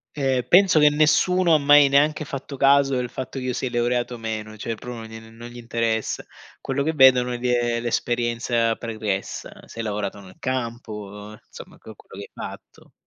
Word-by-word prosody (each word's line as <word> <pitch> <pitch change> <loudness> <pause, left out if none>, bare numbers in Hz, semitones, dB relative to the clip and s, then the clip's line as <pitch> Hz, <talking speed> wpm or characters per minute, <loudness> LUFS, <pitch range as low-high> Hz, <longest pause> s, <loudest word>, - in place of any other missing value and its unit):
Ehm, 135 -3 0
penso 185 -3 +6
che 150 0 +6
nessuno 165 +4 +3
ha - - +6
mai 145 0 +6
neanche 150 +2 +2
fatto 140 0 -7
caso 140 0 +4
del 125 -1 -2
fatto 130 +1 -7
che 130 - -6
io 125 - -1
sia 130 0 -3
laureato 120 +1 -1
o - - -9
meno, 110 -1 -6
cioè 115 +2 -4
pro 125 +2 -8
no - - -9
non 110 +1 -11
gli 120 - -12
interessa. 115 -1 -2 0.4
Quello 135 +1 -2
che 160 +2 -1
vedono 130 -3 +5
è 120 - -3
gl 125 - -6
ehm, 120 -1 0
l'esperienza 120 -1 0
pregressa: 110 -4 -4
se 115 - -12
hai 115 - -3
lavorato 105 -1 -4
nel 95 -1 -14
campo, 120 -3 -4 0.4
uhm, - - -14
insomma, - - -12
que - - -12
che - - -15
hai - - -9
fatto. - - -11
120 Hz, 195 wpm, -23 LUFS, 115-140 Hz, 0.4 s, penso